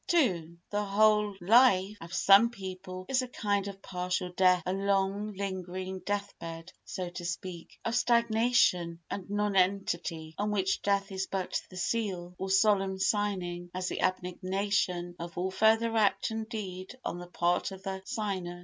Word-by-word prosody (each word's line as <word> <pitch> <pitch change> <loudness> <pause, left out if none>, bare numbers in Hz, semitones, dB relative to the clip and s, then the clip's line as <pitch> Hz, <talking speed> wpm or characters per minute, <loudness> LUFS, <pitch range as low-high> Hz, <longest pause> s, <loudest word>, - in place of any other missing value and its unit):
ii 170 - +1
The 205 0 0
whole 210 0 +3
life 200 0 +5
of 165 0 -9
some 195 +4 +6
people 185 -4 -7
is 265 -1 +2
a 255 - -4
kind 205 -4 -1
of 195 -1 -8
partial 180 0 -2
death—a 180 0 +3
long, 200 +1 0
lingering 185 -1 -4
death 205 +1 -3
bed, 165 +1 -8
so 180 -2 -5
to 175 - -7
speak, 175 0 -6
of 230 - 0
stagnation 235 -8 +3
and 195 -2 -5
nonentity 190 -5 0
on 205 +1 0
which 195 -2 0
death 200 0 +1
is 190 0 -2
but 190 -2 -2
the 185 - -10
seal, 185 -4 -2
or 190 - -3
solemn 195 -1 +3
signing, 185 -3 -1
as 185 0 -2
the - - -3
abnegation 185 -1 -1
of 170 0 -7
all 185 +2 -1
further 225 +3 +3
act 215 0 +2
and 220 0 -4
deed 190 -1 -6
on 175 - -3
the 175 - -8
part 175 0 +1
of 190 0 -10
the 190 -1 -4
signer. 190 -5 -3
190 Hz, 160 wpm, -30 LUFS, 180-205 Hz, -, some